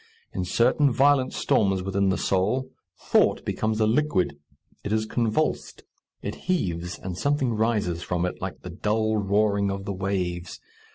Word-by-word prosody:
In 95 - -2
certain 125 +8 +3
violent 135 +1 +3
storms 95 -3 +1
within 95 0 +1
the 95 - +1
soul 105 +8 0 0.3
thought - - +2
becomes 110 0 -1
a 110 - +4
liquid. 110 - +1 0.5
It 100 - -4
is 110 0 +1
convulsed, 115 +6 -1 0.4
it - - -3 0.2
heaves, 90 - -1
and 90 -2 -6
something 140 +2 0
rises 105 -6 0
from 90 0 -1
it, 90 - -4
like - - -5
the - - -7
dull 110 +1 0
roaring 100 0 +2
of 100 0 -4
the 100 - -3
waves. 90 -2 -3
100 Hz, 155 wpm, -25 LUFS, 95-115 Hz, 0.5 s, a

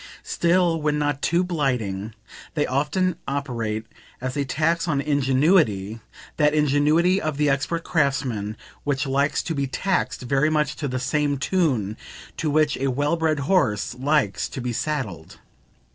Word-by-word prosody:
Still, 170 -1 +2
when 150 0 +1
not 145 -1 -1
too 170 +2 +2
blighting, 120 - -2 0.4
they 150 -2 +2
often 155 +7 0
operate 115 -6 -2 0.3
as 130 0 -4
a 145 - 0
tax 160 +6 0
on 145 -4 +1
ingenuity 135 - +2 0.4
that 150 0 +3
ingenuity 150 +6 +3
of 155 -2 -2
the 150 -1 +3
expert 150 +5 -1
craftsman 130 - 0 0.3
which 145 0 0
likes 140 +2 +1
to 165 - -3
be 140 -2 -1
taxed 190 +8 -1
very 140 +4 +2
much 150 -2 0
to 145 - -2
the 130 -1 -2
same 145 +2 0
tune 130 - 0 0.4
to 160 - -1
which 150 0 +2
a 135 - -1
well 145 +5 +1
bred 160 -3 0
horse 140 - +1
likes 130 -6 0
to - - -6
be 125 -1 -3
saddled. 110 - -4
145 Hz, 150 wpm, -23 LUFS, 130-155 Hz, 0.4 s, that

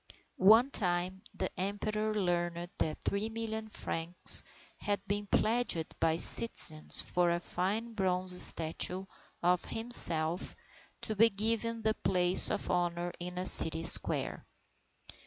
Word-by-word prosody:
One 225 +8 +3
time, 180 -2 -4
the - - -5
Emperor 215 +2 -4
learned 175 -2 -4
that 155 -1 -5
3,000,000 220 +1 -6
francs 165 -2 +2 0.4
had 205 -1 -4
been 205 +1 -5
pledged 220 -7 -2
by 165 0 -1
citizens 165 -6 +5
for 175 -1 -2
a 170 0 -2
fine 205 +7 -5
bronze 185 -3 -1
statue 175 +3 +1 0.4
of 180 +1 0
himself 175 -8 +1 0.5
to 215 - -5
be 225 +3 +3
given 225 +2 -3
the 220 0 -1
place 180 -3 +1
of - - -5
honour 175 0 -4
in 180 +1 -9
a 180 - -5
city 160 -2 +8
square. - - -2
185 Hz, 120 wpm, -29 LUFS, 175-215 Hz, 0.5 s, city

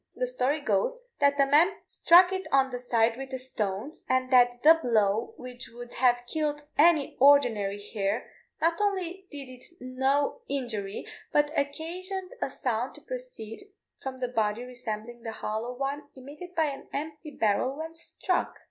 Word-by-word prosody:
The - - 0
story 310 - 0
goes, 215 - +1 0.2
that 285 0 +3
a 275 - +6
man 310 +8 +5
struck 355 +2 +6
it 380 0 -3
on 270 -1 +4
the 245 - -4
side 230 -2 +2
with 270 0 -7
a - - -1
stone, 225 - -3
and 255 0 +1
that 245 -1 +5
the 325 +2 +8
blow, 220 -3 +1
which 250 0 -7
would 240 +1 -10
have 245 -1 +3
killed 295 +1 -2
any 310 -2 +4
ordinary 240 -8 +4
hare, 205 +1 -3 0.3
not 335 +4 +1
only 385 -2 -1
did 285 -3 -8
it 255 -1 -11
no 265 +3 0
injury, 225 -8 -3 0.3
but 295 0 +3
occasioned 360 +7 -3
a - - 0
sound 245 0 -2
to - - -12
proceed - - -7 0.3
from 265 -1 -5
the 255 -1 -2
body 220 -1 0
resembling 240 -2 -6
the 225 -1 -5
hollow 220 +4 -4
one 280 +2 -3
emitted 295 +7 -10
by 320 - +3
an 280 -2 -5
empty 305 +1 -5
barrel 255 +1 0
when 320 +1 -6
struck. 355 +2 -2
265 Hz, 165 wpm, -28 LUFS, 240-310 Hz, 0.3 s, the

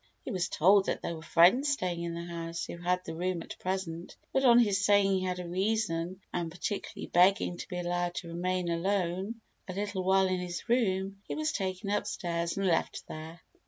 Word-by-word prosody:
He - - -4
was 185 -2 -1
told 195 +4 +4
that - - -2
there 170 - -2
were 160 - -9
friends 180 - +5
staying 180 -11 -1
in 170 0 -3
the 170 - -4
house 170 -1 -4
who - - -7
had 180 +1 0
the 165 - -5
room 175 +1 -2
at - - -10
present, 180 -2 -4 0.2
but, 265 - +2
on 240 -2 +7
his 205 -4 +3
saying 200 -1 +4
he 190 -1 +1
had 180 -1 -1
a 180 -1 -5
reason 185 -2 -1
and 175 -2 -1
particularly 180 +4 -4
begging 180 0 +3
to - - -7
be 180 - -5
allowed 175 0 -1
to 170 - -5
remain 180 +1 -1
alone 190 +4 -1 0.3
a 185 - -5
little 200 -1 -2
while 190 +1 +4
in 185 -1 0
this 175 -1 -5
room, 195 -5 +1
he - - -3
was 310 0 0
taken 190 0 -3
upstairs 170 -4 -1
and 195 - 0
left 170 -3 0
there. 160 +2 -8
185 Hz, 205 wpm, -30 LUFS, 170-195 Hz, 0.3 s, on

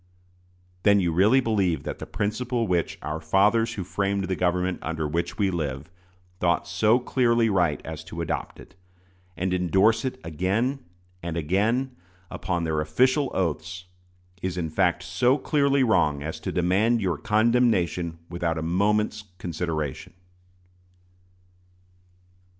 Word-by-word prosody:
Then 100 0 +5
you 90 -3 +1
really 105 +10 +4
believe 95 - 0
that - - -5
the - - -7
principle 115 +3 -1
which 90 -4 -1
"our 75 +1 -3
fathers 110 +6 +2
who 95 - -3
framed 100 +2 -1
the 95 0 -1
government 90 0 0
under 80 -1 -3
which 85 +3 -2
we 100 -2 +1
live" 75 -2 -4 0.5
thought 85 -1 +1
so 105 +7 +3
clearly 120 -3 +2
right 90 -6 +2
as 80 0 -6
to 85 - -8
adopt 85 - -3
it, - - -14 0.6
and 90 +2 -1
indorse 95 +6 +3
it 130 - -3
again 100 - -1 0.4
and 85 0 -4
again, 110 - 0 0.4
upon 85 -2 -2
their 80 -2 0
official 130 - +2
oaths, 90 +1 -2 0.6
is 90 -1 -3
in 80 -3 -2
fact 90 +2 +1
so 125 +7 +2
clearly 140 -1 +2
wrong 85 - +2
as 80 +2 -5
to - - -4
demand 100 +7 +2
your 90 -7 -1
condemnation 105 -7 +1
without 85 -1 -2
a 80 - -3
moment's 105 +5 0
consideration. 80 -5 -4
95 Hz, 135 wpm, -25 LUFS, 85-110 Hz, 0.6 s, Then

